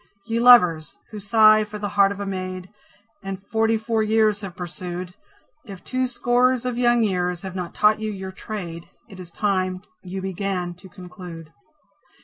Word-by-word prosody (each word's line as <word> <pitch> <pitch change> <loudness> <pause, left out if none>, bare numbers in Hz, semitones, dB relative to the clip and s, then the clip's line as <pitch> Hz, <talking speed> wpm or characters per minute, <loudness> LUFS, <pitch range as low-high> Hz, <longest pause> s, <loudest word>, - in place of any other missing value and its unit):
Ye 230 0 -1
Lovers, 180 -11 +6 0.2
who 215 - -7
sigh 215 +1 +5
for 210 0 -8
the 205 -1 -4
heart 200 -1 +3
of 200 - -6
a 200 - -3
maid, 185 -1 -5 0.5
And 195 -1 -7
forty 225 0 +2
four 220 0 -1
years 215 -1 +2
have 195 -4 -8
pursued, 180 0 -6 0.5
If 195 -7 -11
two 255 0 -1
scores 245 0 +1
of 250 -1 -2
young 240 -1 +3
years 180 -3 -1
have 190 -1 -6
not 180 -2 -5
taught 215 0 +4
you 215 0 -3
your 190 -2 -6
trade, 175 -4 -7 0.2
It 195 -5 -13
is 180 -2 -9
time 185 -1 -1 0.2
you 185 +1 -6
began 190 -1 -3
to 190 +1 -14
conclude. 180 -4 -11
195 Hz, 170 wpm, -23 LUFS, 180-220 Hz, 0.5 s, Lovers